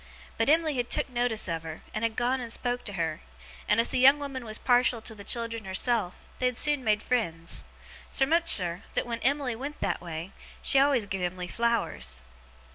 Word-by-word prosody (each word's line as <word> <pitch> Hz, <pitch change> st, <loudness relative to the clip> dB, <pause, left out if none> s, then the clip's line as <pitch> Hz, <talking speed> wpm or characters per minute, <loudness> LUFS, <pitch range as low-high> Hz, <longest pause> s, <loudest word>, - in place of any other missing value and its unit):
But 225 Hz, +4 st, +1 dB
Em'ly 315 Hz, -2 st, +3 dB
had 245 Hz, -1 st, -1 dB
took -, -, +1 dB
notice 240 Hz, -4 st, +1 dB
of 165 Hz, -2 st, -2 dB
her, 160 Hz, -1 st, -8 dB
and -, -, -3 dB
had 225 Hz, -1 st, 0 dB
gone 250 Hz, +2 st, 0 dB
and 235 Hz, -2 st, -5 dB
spoke 245 Hz, +1 st, -1 dB
to 205 Hz, -, -5 dB
her; 165 Hz, -4 st, -2 dB, 0.5 s
and 210 Hz, -, +3 dB
as 230 Hz, -, +2 dB
the 255 Hz, -, 0 dB
young 270 Hz, +3 st, +8 dB
woman 275 Hz, -3 st, -5 dB
was 215 Hz, -1 st, -3 dB
partial 245 Hz, -1 st, +3 dB
to 225 Hz, +1 st, -6 dB
the 205 Hz, -2 st, -10 dB
children 230 Hz, 0 st, -2 dB
herself, 190 Hz, 0 st, +1 dB, 0.2 s
they 255 Hz, -, +2 dB
had 250 Hz, -1 st, -2 dB
soon 295 Hz, -3 st, +2 dB
made 215 Hz, -1 st, +2 dB
friends. 165 Hz, -10 st, -1 dB, 0.4 s
Sermuchser, 270 Hz, -, +2 dB
that -, -, +1 dB
when 235 Hz, -1 st, -3 dB
Em'ly 275 Hz, -3 st, +1 dB
went 280 Hz, +5 st, -6 dB
that -, -, -1 dB
way, 170 Hz, +1 st, -6 dB, 0.3 s
she 270 Hz, -, +5 dB
always 270 Hz, -5 st, +3 dB
giv 195 Hz, -1 st, -4 dB
Em'ly 180 Hz, 0 st, -2 dB
flowers. 175 Hz, -, -1 dB
230 Hz, 200 wpm, -28 LUFS, 190-255 Hz, 0.5 s, young